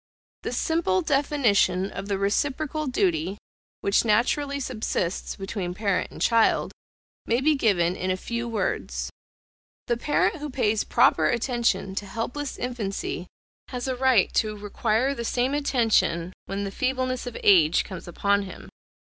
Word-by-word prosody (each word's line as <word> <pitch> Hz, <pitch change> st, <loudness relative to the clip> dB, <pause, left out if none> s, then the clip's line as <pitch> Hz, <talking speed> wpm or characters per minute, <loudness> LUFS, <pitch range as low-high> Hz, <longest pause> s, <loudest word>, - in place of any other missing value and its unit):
The -, -, -4 dB
simple 320 Hz, -, +1 dB
definition 205 Hz, -, +2 dB
of 195 Hz, 0 st, -6 dB
the 200 Hz, -1 st, 0 dB
reciprocal 285 Hz, +9 st, -1 dB
duty, 185 Hz, -6 st, 0 dB, 0.4 s
which 200 Hz, -, +3 dB
naturally 275 Hz, +6 st, +1 dB
subsists 215 Hz, -8 st, -2 dB
between 195 Hz, -2 st, -4 dB
parent 200 Hz, -2 st, 0 dB
and -, -, -11 dB
child, 230 Hz, -1 st, +3 dB, 0.6 s
may 235 Hz, +2 st, +2 dB
be 305 Hz, +4 st, +3 dB
given 185 Hz, -, +2 dB
in 185 Hz, -, -3 dB
a 185 Hz, -, +1 dB
few 235 Hz, +4 st, -4 dB
words: 225 Hz, -3 st, -2 dB, 0.7 s
The 240 Hz, -, 0 dB
parent 320 Hz, +7 st, +1 dB
who 300 Hz, 0 st, -5 dB
pays 220 Hz, -5 st, +1 dB
proper -, -, +4 dB
attention 235 Hz, -5 st, 0 dB
to 200 Hz, +1 st, -4 dB
helpless 245 Hz, +7 st, -4 dB
infancy 205 Hz, -7 st, -3 dB, 0.4 s
has 250 Hz, 0 st, -4 dB
a 260 Hz, -, -1 dB
right 255 Hz, -5 st, +3 dB
to 215 Hz, -1 st, 0 dB
require 215 Hz, +5 st, 0 dB
the 235 Hz, -4 st, -5 dB
same 250 Hz, +3 st, 0 dB
attention 220 Hz, -, +1 dB
when 200 Hz, +1 st, -3 dB
the 195 Hz, -, -4 dB
feebleness 255 Hz, +1 st, -1 dB
of 245 Hz, -, -5 dB
age 170 Hz, -5 st, +5 dB
comes 185 Hz, -3 st, -9 dB
upon 200 Hz, +3 st, +1 dB
him. 195 Hz, -2 st, -9 dB
225 Hz, 145 wpm, -25 LUFS, 195-260 Hz, 0.7 s, age